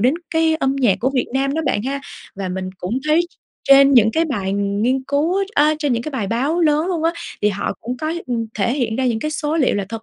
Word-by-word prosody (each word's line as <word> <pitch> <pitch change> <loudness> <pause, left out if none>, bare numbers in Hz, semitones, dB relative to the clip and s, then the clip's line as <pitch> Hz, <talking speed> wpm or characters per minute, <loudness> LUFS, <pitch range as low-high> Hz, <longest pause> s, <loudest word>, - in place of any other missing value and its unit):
đến 255 +7 +3 0.2
cái 320 -1 +2
âm 270 -2 0
nhạc 245 -8 +3
của 260 +3 +1
Việt 255 - +1
Nam 275 +1 0
đó 320 - 0
bạn 205 - 0
ha. 275 +2 -3 0.3
Và 195 -1 -4
mình 185 0 -4
cũng 215 +9 -2
thấy 315 +3 +4 0.5
trên 275 0 +7
những 220 -2 +6 0.2
bài 195 -7 -2
nghiên 205 +6 0
cứu 305 +6 +1
á 395 - +1
a, 305 +1 +4
trên 290 -4 0
những 235 0 -1
bài 225 -6 -2
báo 270 - 0
lớn 310 +1 +2
luôn 345 -4 -2
á, 335 - +2 0.3
thì 210 - +4
họ 200 0 -2
cũng 250 +2 -4
có, 310 +4 -3
ưm, 235 -3 -2
thể 215 +3 0
hiện 240 -5 -1
ra 260 -1 0
những 230 -2 0
cái 305 +6 -3
số 310 0 -2
liệu 275 - +2
là 200 -1 -1
thật 225 0 -6
260 Hz, 250 wpm, -20 LUFS, 220-300 Hz, 0.5 s, trên